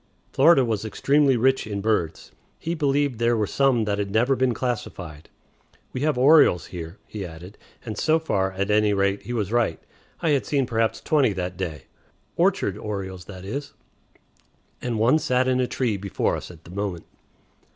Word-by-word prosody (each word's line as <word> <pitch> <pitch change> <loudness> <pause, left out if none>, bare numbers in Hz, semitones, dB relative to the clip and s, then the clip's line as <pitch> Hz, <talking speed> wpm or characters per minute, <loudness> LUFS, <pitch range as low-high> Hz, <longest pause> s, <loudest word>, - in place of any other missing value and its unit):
Florida 135 -2 +5
was 110 -3 -1
extremely 140 +4 +2
rich 130 0 +2
in 100 -2 -3
birds; 100 -6 -1 0.3
he 165 - -3
believed 145 -5 0
there 120 0 +2
were 105 - +1
some 130 +1 +2
that 100 -1 -1
had 100 -1 -2
never 120 +6 +2
been 130 -1 +2
classified. 100 - -5 0.6
"We 130 - -3
have 150 -2 +1
orioles 130 - +5
here," 85 +1 -7
he 105 -2 -6
added; 90 +3 -10 0.3
and 110 -2 -4
so 155 +8 +2
far, 95 -12 -1
at 100 +2 -1
any 105 -1 +3
rate, 100 0 +1
he 120 - -6
was 105 -4 -2
right; 115 -9 +1 0.4
I 165 -3 +1
had 140 -2 +1
seen 140 -3 +1
perhaps 115 -1 0
twenty 140 -8 +2
that 90 -1 -4
day 80 -7 -5 0.5
(orchard - - +1
orioles, 95 -3 -5
that 95 -2 -10
is), 140 +7 -5 1.1
and 120 -2 -2
one 120 +8 +4
sat 130 -3 +1
in 130 0 +2
a 125 - +1
tree 120 -6 -1
before 100 -1 -1
us - - -7
at 85 -3 -14
the 85 - -13
moment. 95 -3 -4
110 Hz, 180 wpm, -24 LUFS, 95-130 Hz, 1.1 s, Florida